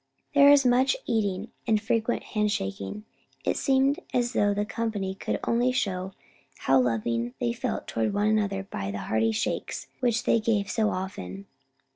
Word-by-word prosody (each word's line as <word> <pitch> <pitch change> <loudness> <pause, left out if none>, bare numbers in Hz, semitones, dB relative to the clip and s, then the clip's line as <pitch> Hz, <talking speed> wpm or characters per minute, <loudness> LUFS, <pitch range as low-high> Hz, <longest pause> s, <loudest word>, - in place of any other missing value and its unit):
There 285 -1 +7
is 285 -2 +6
much 255 - +4
eating, 205 -2 -1 0.2
and 220 -2 +3
frequent 225 +2 0
handshaking. 205 - -2 0.4
It - - +1
seemed 270 +3 +2 0.2
as 240 0 +1
though 205 -2 +3
the 205 +1 0
company 210 -4 -2
could 195 - -3
only 240 +2 +2
show 190 -6 -2 0.5
how 135 0 +4
loving 115 0 -1
they 120 -1 0
felt - - -3
toward 115 -1 -1
one 205 +1 0
another 205 -3 +1
by 100 - -5
the 100 - -4
hearty 110 0 +2
shakes 110 - -3
which 240 -2 +1
they 230 - +3
gave 215 -3 0
so 220 -2 +2
often. 100 - -5
205 Hz, 160 wpm, -27 LUFS, -, 0.5 s, There